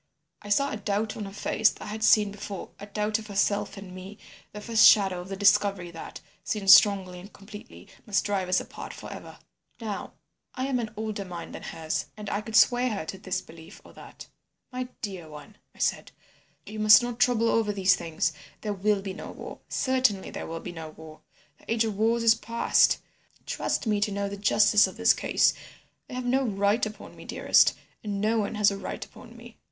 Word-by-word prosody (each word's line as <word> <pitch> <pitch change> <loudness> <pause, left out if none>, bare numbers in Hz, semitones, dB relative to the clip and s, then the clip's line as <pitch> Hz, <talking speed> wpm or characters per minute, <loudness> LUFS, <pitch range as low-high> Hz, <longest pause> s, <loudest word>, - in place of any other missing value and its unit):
"I 205 - -10
saw 280 +7 +2
a - - -3
doubt 210 +1 -2
on 210 - -5
her 195 - -8
face 210 +1 +2
that - - -10
I - - -7
had 220 +1 -5
seen 210 -2 +5
before, 205 -1 -7
a 205 - -9
doubt 210 +1 -1
of 215 - -10
herself 205 0 0
and 195 -2 -10
me, 190 +3 -10 0.3
the 210 - -8
first 220 0 +5
shadow 190 -4 +4
of 180 - -11
the 195 - -4
discovery 195 -2 +2
that, 165 - -9 0.2
seen 205 -3 -3
strongly 195 -3 +6
and 195 +3 -12
completely, 195 - -13 0.2
must 205 -1 +1
drive 195 -3 -1
us 185 - +3
apart - - -9
for - - -9
ever. - - -11 0.4
"Now, 215 -4 -5 0.4
I 260 +2 -2
was 250 - +1
an 220 -2 -5
older 215 -2 -4
mind 175 -3 -8
than - - -8
hers, 160 -1 -4
and 210 -1 -6
I 205 - -1
could 220 +1 -6
sway 245 +4 +5
her 200 -8 -4
to 190 +4 -7
this 185 -1 -3
belief 165 +2 -14
or - - -15
that. - - -12 0.5
"'My 255 0 -4 0.2
dear 185 -6 -6
one,' 150 +7 -12 0.2
I - - -21
said, - - -1 0.5
'you 215 0 -8
must 215 +3 +7
not 240 -1 -4
trouble 230 -2 +3
over 220 -2 +1
these 190 -2 +3
things. 160 -1 -2 0.3
There 210 -1 -2
will 200 0 0
be 195 -1 -5
no 200 - -8
war. - - -9
Certainly 255 -7 +1
there - - -6
will 165 0 -6
be - - -7
no 165 -2 -8
war. 155 0 -13 0.4
The - - -9
age 230 0 +2
of 215 -2 -3
wars 225 +3 +1
is 225 -1 +7
past. 230 +1 +2 0.5
Trust - - -2
me 210 -2 0
to 205 - +1
know 200 0 -2
the 200 - -5
justice 205 0 +4
of 190 - -10
this 225 0 +5
case. - - +2 0.5
They - - -8
have 255 0 -4
no 260 +2 +2
right 205 -1 +1
upon 215 - -11
me, - - -12
dearest, - - +3 0.3
and 205 -2 -3
no 220 +2 +1
one 210 +1 -2
has 210 -1 +4
a 200 - -4
right - - -6
upon - - -15
me. - - -14
205 Hz, 215 wpm, -27 LUFS, 195-220 Hz, 0.5 s, must